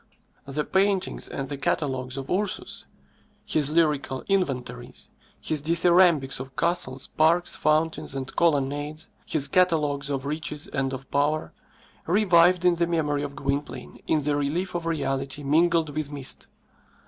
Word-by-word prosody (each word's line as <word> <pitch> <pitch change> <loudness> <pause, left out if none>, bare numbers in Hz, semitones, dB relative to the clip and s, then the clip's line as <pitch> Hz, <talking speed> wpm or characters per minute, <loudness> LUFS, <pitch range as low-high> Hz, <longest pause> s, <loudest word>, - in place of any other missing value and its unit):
The 145 +2 -1
paintings 190 +1 0
and 135 - -5
the 140 0 -5
catalogues 130 -2 -1
of 135 0 -5
Ursus, 195 +3 -2 0.6
his 150 -2 +1
lyrical 150 -4 +1
inventories, 135 - -2 0.3
his 155 -2 -1
dithyrambics 170 -3 +3
of 130 0 -8
castles, 165 -6 -1
parks, 165 +3 +2
fountains, 155 -2 0
and 135 -1 -5
colonnades, 145 -1 0 0.2
his 145 -3 +2
catalogues 150 -6 +2
of 135 -1 -2
riches 150 0 -3
and 135 -1 -2
of 135 0 -7
power, 145 +2 0 0.5
revived 180 -2 +4
in 180 - +6
the 170 0 +1
memory 150 -4 0
of 140 -1 -5
Gwynplaine 140 +1 -4
in 155 -2 +1
the 145 0 +1
relief 150 +6 -1
of 170 -1 -3
reality 140 -2 -2
mingled 165 +2 +2
with 155 -2 -2
mist. 140 -2 -4
150 Hz, 135 wpm, -25 LUFS, 140-170 Hz, 0.6 s, in